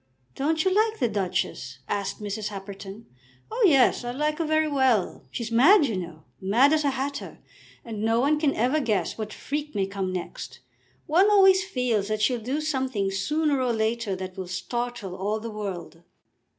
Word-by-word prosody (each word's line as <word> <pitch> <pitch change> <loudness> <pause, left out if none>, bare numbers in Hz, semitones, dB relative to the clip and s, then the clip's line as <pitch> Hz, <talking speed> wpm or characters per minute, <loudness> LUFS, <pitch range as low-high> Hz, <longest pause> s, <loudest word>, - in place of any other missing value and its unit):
"Don't 315 +4 0
you 375 - +3
like 435 +2 +2
the 245 - +2
Duchess?" 185 - -2
asked 200 -1 -2
Mrs. 210 0 -3
Happerton. 200 +1 -8 0.5
"Oh, 470 +2 0
yes; 270 -4 +4
I 240 - -4
like 300 +5 -1
her 330 - 0
very 310 0 +2
well. 260 -9 +1
She's 235 -2 -5
mad, 295 - +6
you 230 -6 -2
know, 170 -4 -6 0.2
mad 235 +10 +4
as 310 -1 +2
a 285 - +2
hatter, 275 +2 -4 0.5
and 220 -3 -5
no 225 +1 +2
one 295 +4 +2
can 295 -3 +1
ever 255 +7 +2
guess 225 -8 0
what 215 -1 -5
freak 295 +4 -5
may 195 -1 +1
come 195 -1 -3
next. 170 -8 -6 0.5
One 365 +7 +4
always 385 -2 +6
feels 250 - -1
that 215 0 -1
she'll 240 +2 +1
do 265 +7 -2
something 260 -10 -1
sooner 290 +8 0
or 250 -2 +1
later 220 -2 -1
that 185 0 -7
will 190 -1 -5
startle 205 +2 -4
all 205 +3 -2
the 230 +1 -6
world." 195 -5 -6
235 Hz, 180 wpm, -26 LUFS, 200-295 Hz, 0.5 s, mad